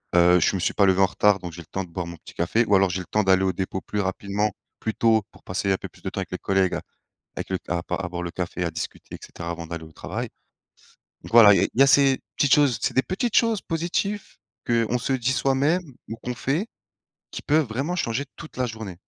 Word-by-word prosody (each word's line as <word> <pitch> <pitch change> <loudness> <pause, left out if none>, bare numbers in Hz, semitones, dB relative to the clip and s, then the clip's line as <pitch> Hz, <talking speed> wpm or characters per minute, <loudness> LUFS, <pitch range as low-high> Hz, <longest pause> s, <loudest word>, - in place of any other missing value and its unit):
Heu, 90 +1 +6
je 85 - +2
me 95 - -2
suis - - 0
pas 100 - +4
levé 95 0 +3
en - - +7
retard. 105 +2 +3
Donc, 90 -2 -7
j'ai 85 +2 -9
le - - -14
temps 95 +3 -3
de 90 - -12
boire 85 0 -4
mon 85 - -7
petit - - -14
café 90 +7 +1
ou 100 - +3
alors, 95 0 +4
j'ai 90 +1 -2
le - - -9
temps 105 - +1
d'aller 95 0 +4
au 95 - +2
dépôt, 95 +1 -3
plus 105 - -4
rapidement, 100 +2 -1 0.3
plus 110 - -2
tôt, 110 -2 +3
pour - - -20
passer 95 +2 -2
un 95 - +2
peu - - -8
plus - - -21
de - - -3
temps - - -5
avec - - -5
les - - -2
collègues. 95 -1 +1 0.6
Avec - - -5
le 95 - 0
ta 85 -1 -3
à - - -7
pas 90 - -2
à 90 - -3
boire 90 0 -4
le 90 - -3
café, 90 0 -4
à 85 - 0
discuter 80 0 -7
et - - -8
cetera, 85 0 -7
avant 85 0 -5
d'aller 85 -1 -6
au 80 - -14
travail. - - -5 0.9
Donc, - - -11
voilà, 110 -3 +9
il 95 - +3
y 135 - +7
a - - +5
ces 135 -1 +5 0.2
petites 145 - +3
choses. 140 -6 +3
C'est - - -1
des 130 - +4
petites 205 +5 -2
choses 230 -3 +3
positives 175 +5 -2 0.3
qu'on 115 0 +1
se 125 +2 -1
dit 130 0 0
soi-même 140 +7 +2 0.2
ou 115 - -5
qu'on 125 +2 -5
fait 140 - -1 0.7
qui - - -7
peuvent 150 0 +2
vraiment 135 +10 -2
changer 125 -4 -1
toute 155 - -11
la 130 - 0
journée. 110 -6 -7
105 Hz, 260 wpm, -24 LUFS, 90-130 Hz, 0.9 s, voilà